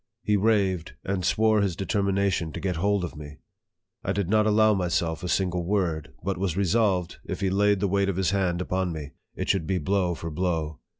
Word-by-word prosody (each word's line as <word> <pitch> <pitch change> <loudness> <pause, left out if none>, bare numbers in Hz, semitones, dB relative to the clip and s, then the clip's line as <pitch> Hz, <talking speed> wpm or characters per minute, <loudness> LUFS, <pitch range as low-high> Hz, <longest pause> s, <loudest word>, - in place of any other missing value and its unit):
He 105 - +2
raved, 100 -5 +1
and 95 -1 -2
swore 110 +3 +3
his 95 -4 0
determination 100 -4 0
to - - -5
get 90 -3 -2
hold 100 +2 +1
of 85 - -5
me. 75 0 -9 0.7
I - - -1
did 100 -1 -1
not 110 0 +4
allow 110 0 +4
myself 90 -3 -1
a 90 - -4
single 90 -1 0
word; 85 -5 -1
but 95 0 -2
was 95 -3 -1
resolved, 95 -3 +1
if - - -4
he 95 -1 0
laid 100 0 +3
the 100 - +1
weight 100 +1 +1
of 95 - -2
his 95 -1 +1
hand 90 -3 0
upon 95 0 -1
me, 75 -3 -6 0.2
it - - -4
should 95 -5 +1
be 95 - +1
blow 90 +1 0
for 85 0 -6
blow. 80 -2 -2
95 Hz, 205 wpm, -26 LUFS, 85-100 Hz, 0.7 s, not